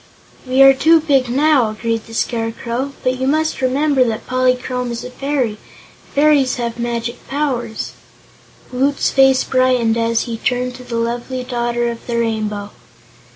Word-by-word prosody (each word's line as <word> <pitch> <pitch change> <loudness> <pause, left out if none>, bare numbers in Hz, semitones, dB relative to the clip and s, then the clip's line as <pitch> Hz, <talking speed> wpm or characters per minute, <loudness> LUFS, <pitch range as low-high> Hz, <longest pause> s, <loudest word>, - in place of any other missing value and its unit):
"We 260 +1 +5
are 270 0 +8
too 320 +5 +4
big 275 -5 +1
now," 275 -2 +3
agreed 225 +1 -3
the 225 - -10
Scarecrow, 235 +4 -2
"but 255 0 0
you 260 - -1
must 310 +1 0
remember 270 +1 +2
that 225 -2 -3
Polychrome 255 -1 0
is 235 0 -5
a 250 - -8
fairy, 275 -2 -1
and - - -23
fairies 285 -3 +3
have 235 -1 -4
many 240 0 -2
magic 235 0 -5
powers." 255 -6 -2 0.8
Woot's 275 +3 +1
face 270 -1 +4
brightened 255 -3 +2
as 230 0 +1
he 230 -2 -4
turned 250 +2 -1
to 250 - -11
the 245 -1 -6
lovely 240 +2 -3
Daughter 240 -1 -1
of 230 - -10
the 235 -1 -1
Rainbow. 215 -3 -2
250 Hz, 160 wpm, -18 LUFS, 235-270 Hz, 0.8 s, are